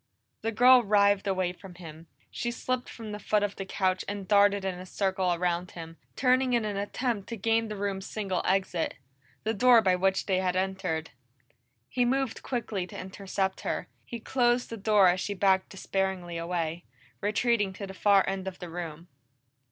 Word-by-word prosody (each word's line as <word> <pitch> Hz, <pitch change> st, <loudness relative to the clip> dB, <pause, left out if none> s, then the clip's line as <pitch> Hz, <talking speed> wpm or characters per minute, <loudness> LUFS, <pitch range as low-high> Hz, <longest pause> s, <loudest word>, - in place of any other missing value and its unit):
The 225 Hz, -, -1 dB
girl 250 Hz, +3 st, +7 dB
writhed 200 Hz, -1 st, +3 dB
away 185 Hz, -2 st, 0 dB
from 185 Hz, 0 st, -13 dB
him. 165 Hz, -2 st, -11 dB, 0.2 s
She 240 Hz, -, -3 dB
slipped 250 Hz, +1 st, -3 dB
from 225 Hz, -2 st, -8 dB
the 210 Hz, -, -5 dB
foot 210 Hz, 0 st, +1 dB
of 205 Hz, -1 st, -2 dB
the 195 Hz, -, -6 dB
couch 185 Hz, -1 st, 0 dB
and 200 Hz, -2 st, -5 dB
darted 200 Hz, -1 st, +4 dB
in 190 Hz, -, -1 dB
a 185 Hz, -, -8 dB
circle 190 Hz, -1 st, 0 dB
around 175 Hz, 0 st, -1 dB
him, 165 Hz, 0 st, -8 dB, 0.2 s
turning 255 Hz, 0 st, +3 dB
in 235 Hz, -2 st, +2 dB
an 210 Hz, -1 st, -2 dB
attempt 205 Hz, +1 st, -2 dB
to 230 Hz, -, -4 dB
gain 225 Hz, +2 st, +1 dB
the 215 Hz, -, -5 dB
room's 195 Hz, -1 st, -3 dB
single 195 Hz, -4 st, -2 dB
exit 185 Hz, -3 st, 0 dB, 0.5 s
the 220 Hz, -, 0 dB
door 240 Hz, +2 st, +6 dB
by 185 Hz, -2 st, +4 dB
which 190 Hz, +1 st, +1 dB
they 190 Hz, -2 st, +1 dB
had 185 Hz, -1 st, 0 dB
entered. 185 Hz, -4 st, -2 dB, 0.8 s
He 250 Hz, -, 0 dB
moved 265 Hz, 0 st, 0 dB
quickly 220 Hz, -7 st, -3 dB
to -, -, -10 dB
intercept 190 Hz, 0 st, -3 dB
her; -, -, -3 dB
he 235 Hz, -, -7 dB
closed 240 Hz, +1 st, +1 dB
the -, -, -3 dB
door 205 Hz, -2 st, +4 dB
as 180 Hz, +1 st, +3 dB
she 205 Hz, +2 st, -3 dB
backed 190 Hz, -1 st, +2 dB
despairingly 190 Hz, -2 st, -2 dB
away, 170 Hz, 0 st, -2 dB, 0.4 s
retreating 210 Hz, 0 st, +1 dB
to 200 Hz, -, -6 dB
the 190 Hz, -, -8 dB
far 200 Hz, 0 st, +4 dB
end 195 Hz, 0 st, -3 dB
of 185 Hz, -1 st, -5 dB
the 175 Hz, -2 st, -8 dB
room. 165 Hz, -1 st, -6 dB
195 Hz, 185 wpm, -28 LUFS, 185-215 Hz, 0.8 s, girl